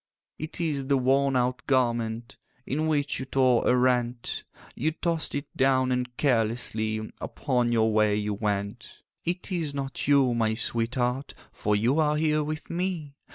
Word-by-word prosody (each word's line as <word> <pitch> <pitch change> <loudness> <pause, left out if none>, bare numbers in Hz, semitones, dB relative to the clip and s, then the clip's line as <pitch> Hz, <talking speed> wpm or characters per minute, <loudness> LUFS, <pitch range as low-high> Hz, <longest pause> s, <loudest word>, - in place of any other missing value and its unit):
'It 155 +2 -5
is 145 -5 -1
the 140 -1 +3
worn 135 +1 +2
out 125 +2 +1
garment 120 -3 0 0.3
In 155 +4 -1
which 145 -2 0
you 130 - -4
tore 130 -3 +3
a - - +5
rent; 125 -1 0 0.3
You 155 +5 -1
tossed 165 -2 -1
it 145 +1 -2
down, 130 -1 +3
and 125 -1 -2
carelessly 110 -4 0
Upon 125 -4 0
your 110 -1 +2
way 105 -1 +3
you 105 0 -1
went. 100 -1 -4 0.2
'It 180 +3 -3
is 160 -6 -1
not 135 -1 -4
you, 140 -4 +4
my 110 -2 +1
sweetheart, 125 +3 -1 0.2
For 105 0 0
you 120 +9 +2
are 150 -1 +2
here 155 -1 +2
with 155 +1 -5
me. 170 -5 -2
130 Hz, 155 wpm, -27 LUFS, 115-145 Hz, 0.3 s, a